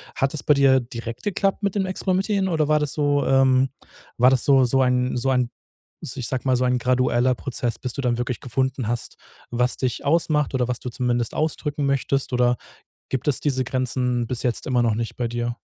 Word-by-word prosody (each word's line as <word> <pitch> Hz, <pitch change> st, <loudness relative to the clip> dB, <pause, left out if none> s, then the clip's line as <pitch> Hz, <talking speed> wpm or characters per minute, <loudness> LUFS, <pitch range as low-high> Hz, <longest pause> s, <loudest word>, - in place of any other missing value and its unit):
Hat 135 Hz, 0 st, 0 dB
es 155 Hz, -, -3 dB
bei 150 Hz, -, +4 dB
dir 135 Hz, -2 st, +5 dB
direkt 115 Hz, -1 st, -7 dB
geklappt 195 Hz, 0 st, 0 dB
mit 200 Hz, -1 st, 0 dB
dem 195 Hz, -2 st, +1 dB
Experimentieren 190 Hz, +1 st, 0 dB
oder 160 Hz, -4 st, +1 dB
war 155 Hz, 0 st, +4 dB
das 150 Hz, -2 st, -2 dB
so, 145 Hz, -1 st, +1 dB
ähm 135 Hz, 0 st, +4 dB, 0.5 s
war 125 Hz, +2 st, +6 dB
das 130 Hz, -2 st, +1 dB
so 135 Hz, -2 st, +5 dB
so 130 Hz, +2 st, +2 dB
ein 125 Hz, -1 st, +1 dB
so 135 Hz, +2 st, 0 dB
ein, 125 Hz, -2 st, +1 dB, 0.5 s
s 140 Hz, -4 st, -2 dB
ich 125 Hz, -4 st, -3 dB
sag 130 Hz, 0 st, -3 dB
mal, 130 Hz, -1 st, +3 dB
so 125 Hz, -, +1 dB
ein 125 Hz, 0 st, +2 dB
gradueller 125 Hz, 0 st, +2 dB
Prozess, 120 Hz, -2 st, -3 dB
bis 125 Hz, -2 st, -4 dB
du -, -, -3 dB
dann 120 Hz, -2 st, 0 dB
wirklich 120 Hz, 0 st, -3 dB
gefunden 130 Hz, -1 st, -2 dB
hast, 120 Hz, 0 st, -3 dB, 0.3 s
was 125 Hz, +1 st, 0 dB
dich 125 Hz, -2 st, -2 dB
ausmacht 150 Hz, -2 st, +1 dB
oder 125 Hz, -2 st, +1 dB
was 125 Hz, -1 st, -2 dB
du 125 Hz, -, -5 dB
zumindest 120 Hz, -1 st, -1 dB
ausdrücken 150 Hz, -2 st, -1 dB
möchtest? 140 Hz, -1 st, 0 dB
Oder 125 Hz, 0 st, +2 dB, 0.5 s
gibt 135 Hz, +2 st, -2 dB
es 145 Hz, -, +1 dB
diese 130 Hz, -3 st, 0 dB
Grenzen 125 Hz, -1 st, -1 dB
bis 120 Hz, 0 st, -3 dB
jetzt 120 Hz, -2 st, -1 dB
immer 125 Hz, -2 st, +2 dB
noch 115 Hz, -2 st, +2 dB
nicht 115 Hz, +1 st, -4 dB
bei 120 Hz, -, -1 dB
dir? 120 Hz, 0 st, -3 dB
130 Hz, 215 wpm, -23 LUFS, 125-140 Hz, 0.5 s, war